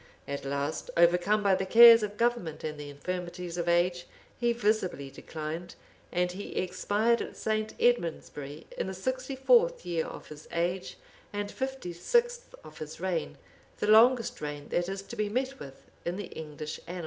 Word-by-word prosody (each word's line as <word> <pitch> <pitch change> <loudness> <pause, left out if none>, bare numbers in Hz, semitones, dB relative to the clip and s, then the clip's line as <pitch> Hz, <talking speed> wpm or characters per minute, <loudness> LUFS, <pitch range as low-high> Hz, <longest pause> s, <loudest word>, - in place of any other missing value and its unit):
At 140 0 -4
last, 140 +2 -2
overcome 180 +5 +4
by 200 -1 +4
the 190 0 +1
cares 230 +1 +10
of 210 0 -4
government 235 -9 0
and 150 -1 -4
the 145 -1 -7
infirmities 175 +3 -5
of 175 -1 -1
age, 175 0 +2 0.3
he 240 -1 +1
visibly 210 - 0
declined, 160 +4 -6 0.4
and 180 0 +1
he 195 +3 -7
expired 205 +5 +1
at - - -7
St. 215 0 -1
Edmondsbury 160 - -1
in - - -2
the 190 - -4
sixty 260 +7 -3
fourth - - +3
year 170 -2 -1
of - - -9
his 150 0 -11
age, 175 +2 -2 0.3
and 205 0 -3
fifty 265 -9 -4
sixth 480 - 0
of 155 -1 -13
his 155 0 -7
reign;[] 180 -2 -2 0.4
the - - -1
longest 230 +1 +5
reign 145 -1 -5
that 175 +1 0
is 195 0 -4
to 235 - -9
be 210 -2 -1
met 260 +4 -2
with 135 -1 -12
in 175 - -2
the 200 -2 -6
English 155 -1 -6
annals. 180 +1 -5
185 Hz, 170 wpm, -29 LUFS, 165-225 Hz, 0.4 s, cares